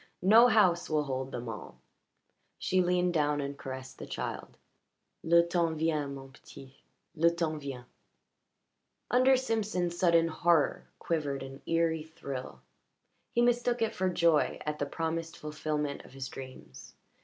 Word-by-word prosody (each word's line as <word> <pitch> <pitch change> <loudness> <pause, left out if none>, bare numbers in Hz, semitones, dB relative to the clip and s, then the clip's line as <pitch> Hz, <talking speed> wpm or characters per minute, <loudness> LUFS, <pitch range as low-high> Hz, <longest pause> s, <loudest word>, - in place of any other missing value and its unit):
No 225 +6 +8
house 190 -7 +3
will 155 -1 +1
hold 130 -1 -4
them 120 -2 -5
all." 110 -2 -8 0.8
She 185 0 +1
leaned 180 0 +1
down 150 -2 +1
and 140 0 -3
caressed 130 -1 -8
the - - -7
child. - - -5 0.7
"Le 170 +1 +5
temps 170 -2 0
vient, 155 -3 0
mon 135 0 -10
petit. 135 0 -15 0.3
Le 170 0 +4
temps 165 -3 -2
vient." 135 -3 -6 1.3
Under 255 +2 +5
Simpson's 210 -8 -1
sudden 170 -2 +4
horror 165 -1 +1
quivered 145 -5 -2
an 135 +1 -10
eerie 165 -1 +1
thrill. 140 -4 -7 0.7
He 240 - +2
mistook 245 0 +2
it 225 0 -1
for 185 0 0
joy 170 -3 +2
at 150 0 -3
the 145 - -1
promised 165 +1 -3
fulfilment 150 -1 -3
of - - -16
his 135 -1 -6
dreams. 130 - -11
160 Hz, 145 wpm, -30 LUFS, 140-175 Hz, 1.3 s, No